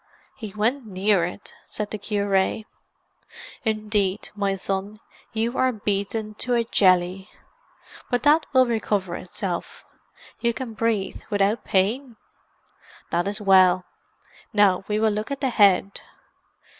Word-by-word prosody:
"He 220 Hz, -5 st, -7 dB
went 235 Hz, +4 st, 0 dB
near 190 Hz, -2 st, +2 dB
it," 180 Hz, +3 st, -8 dB
said 210 Hz, -1 st, -4 dB
the 215 Hz, -, -4 dB
cure. 200 Hz, 0 st, 0 dB, 1.0 s
"Indeed, 215 Hz, -3 st, -1 dB
my 200 Hz, -2 st, -1 dB
son, 195 Hz, +2 st, -3 dB, 0.3 s
you 230 Hz, +2 st, -1 dB
are 260 Hz, 0 st, +3 dB
beaten 210 Hz, 0 st, -2 dB
to 245 Hz, 0 st, +1 dB
a 235 Hz, -, +2 dB
jelly. 185 Hz, -2 st, +2 dB, 0.8 s
But 245 Hz, -, 0 dB
that 300 Hz, +2 st, +4 dB
will 260 Hz, -2 st, +5 dB
recover 210 Hz, -6 st, -1 dB
itself. 180 Hz, -1 st, -5 dB, 0.5 s
You 235 Hz, -1 st, 0 dB
can 250 Hz, -4 st, -5 dB
breathe 220 Hz, -3 st, -1 dB
without 205 Hz, +1 st, +1 dB
pain? 230 Hz, +7 st, 0 dB, 1.0 s
That 175 Hz, +2 st, 0 dB
is 205 Hz, +2 st, -3 dB
well. 185 Hz, -2 st, +5 dB, 0.7 s
Now 200 Hz, -3 st, +3 dB
we 210 Hz, 0 st, 0 dB
will 220 Hz, 0 st, +3 dB
look 210 Hz, +3 st, -3 dB
at 280 Hz, -1 st, -4 dB
the 265 Hz, -3 st, 0 dB
head." 200 Hz, -3 st, +3 dB
210 Hz, 130 wpm, -24 LUFS, 195-225 Hz, 1.0 s, will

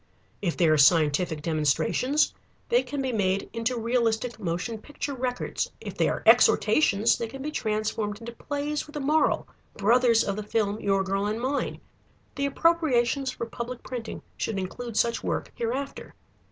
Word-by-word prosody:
If 175 Hz, -5 st, -1 dB
they 170 Hz, -, +4 dB
are 155 Hz, -1 st, +4 dB
scientific 155 Hz, +1 st, +3 dB
demonstrations, 160 Hz, -, +1 dB, 0.4 s
they 485 Hz, +1 st, +4 dB
can 285 Hz, -2 st, -4 dB
be 260 Hz, -, -1 dB
made 195 Hz, -3 st, 0 dB
into 230 Hz, +2 st, -1 dB
realistic 230 Hz, 0 st, 0 dB
motion 190 Hz, +4 st, -3 dB
picture 290 Hz, +3 st, -5 dB
records. 250 Hz, -1 st, -2 dB
If -, -, -7 dB
they -, -, +2 dB
are -, -, -3 dB
exhortations, 225 Hz, -7 st, +5 dB
they 230 Hz, -, -2 dB
can 270 Hz, +4 st, -8 dB
be 300 Hz, -, -3 dB
transformed 215 Hz, -3 st, -2 dB
into 235 Hz, 0 st, -7 dB
plays 290 Hz, +5 st, -3 dB
with 300 Hz, -, -14 dB
a -, -, -2 dB
moral, 300 Hz, +3 st, +2 dB, 0.3 s
brothers 230 Hz, +2 st, +4 dB
of 200 Hz, 0 st, -2 dB
the -, -, -2 dB
film 210 Hz, 0 st, -1 dB
Your 195 Hz, -1 st, +1 dB
Girl 195 Hz, +1 st, -1 dB
and 215 Hz, +2 st, -2 dB
Mine. 265 Hz, +4 st, -2 dB, 0.5 s
The 280 Hz, 0 st, -1 dB
appropriations 280 Hz, -5 st, +2 dB
for 235 Hz, -, -4 dB
public 235 Hz, +2 st, -6 dB
printing 240 Hz, -3 st, -6 dB
should 215 Hz, -, -2 dB
include 215 Hz, +5 st, -5 dB
such 235 Hz, 0 st, +1 dB
work -, -, -2 dB
hereafter. 255 Hz, +4 st, -4 dB
230 Hz, 165 wpm, -26 LUFS, 200-260 Hz, 0.5 s, exhortations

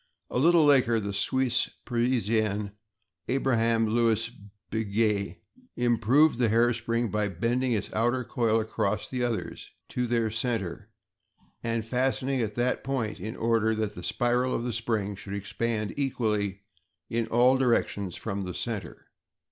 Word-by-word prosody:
A -, -, 0 dB
little 165 Hz, +2 st, +5 dB
later, 125 Hz, -5 st, +4 dB
the 100 Hz, -1 st, -4 dB
Swiss 125 Hz, +4 st, +1 dB, 0.2 s
Parisian, 110 Hz, -4 st, 0 dB, 0.6 s
Abraham 115 Hz, -3 st, +2 dB
Louis 115 Hz, 0 st, +1 dB, 0.4 s
Breguét, 105 Hz, -2 st, 0 dB, 0.4 s
improved 120 Hz, +4 st, +3 dB
the 120 Hz, -3 st, +3 dB
hair 120 Hz, +2 st, +4 dB
spring 115 Hz, -1 st, -1 dB
by 105 Hz, -1 st, 0 dB
bending 120 Hz, +7 st, 0 dB
its 105 Hz, -, -3 dB
outer 120 Hz, +3 st, +1 dB
coil 115 Hz, -2 st, +1 dB
across 105 Hz, -1 st, -1 dB
the 125 Hz, -1 st, -2 dB
others 105 Hz, -9 st, -3 dB, 0.2 s
to 125 Hz, -1 st, -1 dB
their 115 Hz, -2 st, +1 dB
center 110 Hz, -6 st, -2 dB, 0.7 s
and 115 Hz, -1 st, -1 dB
fastening 130 Hz, +2 st, 0 dB
it -, -, +1 dB
at 105 Hz, -1 st, -8 dB
that 125 Hz, +1 st, 0 dB
point 125 Hz, -7 st, -2 dB
in 110 Hz, +5 st, -5 dB
order 115 Hz, -1 st, +1 dB
that 110 Hz, -1 st, -2 dB
the 90 Hz, -, -8 dB
spiral 120 Hz, +6 st, +1 dB
of -, -, -2 dB
the 120 Hz, -1 st, -2 dB
spring 110 Hz, -2 st, -1 dB
should 95 Hz, +1 st, -7 dB
expand 110 Hz, +1 st, -2 dB
equally 105 Hz, -8 st, -1 dB, 0.4 s
in 115 Hz, -1 st, -1 dB
all 125 Hz, +3 st, +4 dB
directions 115 Hz, -7 st, 0 dB
from 100 Hz, -3 st, -4 dB
the 90 Hz, -1 st, -5 dB
center. 105 Hz, -9 st, -4 dB
115 Hz, 145 wpm, -27 LUFS, 105-120 Hz, 0.7 s, little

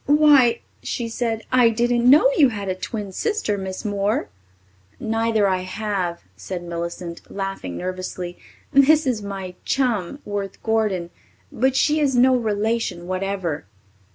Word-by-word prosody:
why!" 285 Hz, -5 st, +5 dB, 0.2 s
she 235 Hz, -, -3 dB
said. 225 Hz, -1 st, -2 dB
"I 250 Hz, -2 st, +5 dB
didn't 240 Hz, +1 st, +2 dB
know 305 Hz, -, +7 dB
you 280 Hz, -5 st, +6 dB
had 205 Hz, -4 st, -5 dB
a -, -, +1 dB
twin 200 Hz, +2 st, -5 dB
sister, 415 Hz, -, -1 dB
Miss 190 Hz, +2 st, -5 dB
Moore." 205 Hz, +1 st, 0 dB, 0.7 s
"Neither 225 Hz, -1 st, +1 dB
I 185 Hz, -1 st, +1 dB
have," 185 Hz, -2 st, -3 dB
said 100 Hz, -, -6 dB
Millicent, 170 Hz, 0 st, -5 dB
laughing 195 Hz, -, -4 dB
nervously. 185 Hz, -1 st, -5 dB, 0.3 s
"This 295 Hz, +3 st, +5 dB
is 245 Hz, -5 st, 0 dB
my 195 Hz, -2 st, -6 dB
chum, 245 Hz, -5 st, 0 dB
Worth 200 Hz, -2 st, -5 dB
Gordon, 210 Hz, -6 st, 0 dB, 0.4 s
but 265 Hz, +2 st, +1 dB
she 300 Hz, +3 st, +3 dB
is 280 Hz, -4 st, +2 dB
no 255 Hz, +1 st, +5 dB
relation 215 Hz, -5 st, -1 dB
whatever." 185 Hz, -, -3 dB
210 Hz, 135 wpm, -22 LUFS, 185-245 Hz, 0.7 s, know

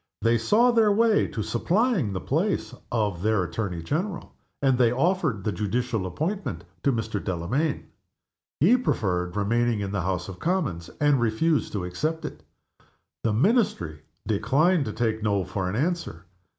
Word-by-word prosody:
They 115 Hz, 0 st, +3 dB
saw 225 Hz, -, +4 dB
their 225 Hz, -3 st, +4 dB
way 220 Hz, 0 st, +3 dB
to 110 Hz, -, -4 dB
supplying 180 Hz, -, +1 dB
the 95 Hz, -, -3 dB
place 155 Hz, -, -1 dB, 0.2 s
of 105 Hz, -7 st, 0 dB
their 110 Hz, -2 st, +2 dB
Attorney 90 Hz, -2 st, -3 dB
General, 170 Hz, -, -3 dB, 0.3 s
and 135 Hz, -2 st, +3 dB
they 120 Hz, -2 st, +4 dB
offered 145 Hz, -, +1 dB
the 105 Hz, -, 0 dB
judicial 110 Hz, -1 st, -1 dB
appointment 155 Hz, -, -3 dB, 0.2 s
to 140 Hz, -, +2 dB
Mr. 110 Hz, -4 st, -2 dB
Delamayn. 105 Hz, -, -1 dB, 0.7 s
He 205 Hz, -, +5 dB
preferred 90 Hz, -, -1 dB
remaining 115 Hz, +2 st, +1 dB
in 100 Hz, -1 st, -3 dB
the 100 Hz, -2 st, -1 dB
House 90 Hz, 0 st, -2 dB
of 95 Hz, -2 st, -8 dB
Commons, 160 Hz, -, -1 dB
and 145 Hz, -3 st, +3 dB
refused 130 Hz, +8 st, +1 dB
to 95 Hz, -4 st, -2 dB
accept 155 Hz, -, -2 dB
it. -, -, -7 dB, 0.8 s
The 110 Hz, -, +1 dB
Ministry 115 Hz, -, +1 dB, 0.2 s
declined 145 Hz, -, +2 dB
to 110 Hz, -, -3 dB
take 110 Hz, 0 st, -1 dB
No 100 Hz, -2 st, +1 dB
for 95 Hz, -1 st, -3 dB
an 95 Hz, -, -3 dB
answer. 150 Hz, -, -2 dB
115 Hz, 155 wpm, -26 LUFS, 100-165 Hz, 0.8 s, He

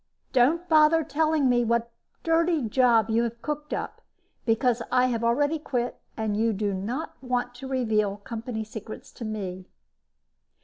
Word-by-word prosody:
Don't 300 Hz, +8 st, +3 dB
bother 315 Hz, 0 st, +5 dB
telling 310 Hz, -1 st, +1 dB
me 245 Hz, -1 st, +3 dB
what 235 Hz, 0 st, 0 dB, 0.3 s
dirty 330 Hz, -2 st, +2 dB
job 230 Hz, -1 st, +3 dB
you 225 Hz, +1 st, +3 dB
have 235 Hz, 0 st, -3 dB
cooked 300 Hz, 0 st, -4 dB
up, -, -, -4 dB, 0.5 s
because 235 Hz, +1 st, +2 dB
I 250 Hz, 0 st, +4 dB
have 235 Hz, -2 st, -1 dB
already 290 Hz, +7 st, +2 dB
quit 245 Hz, -4 st, -3 dB, 0.2 s
and 220 Hz, -2 st, -1 dB
you 225 Hz, +1 st, +2 dB
do 205 Hz, 0 st, -1 dB
not 230 Hz, +11 st, -4 dB
want 250 Hz, -1 st, -1 dB
to 265 Hz, +1 st, -7 dB
reveal 215 Hz, -6 st, 0 dB
company 220 Hz, +2 st, -5 dB
secrets 220 Hz, +4 st, -9 dB
to 235 Hz, -, -8 dB
me." 190 Hz, -4 st, -5 dB
240 Hz, 150 wpm, -26 LUFS, 220-285 Hz, 0.5 s, bother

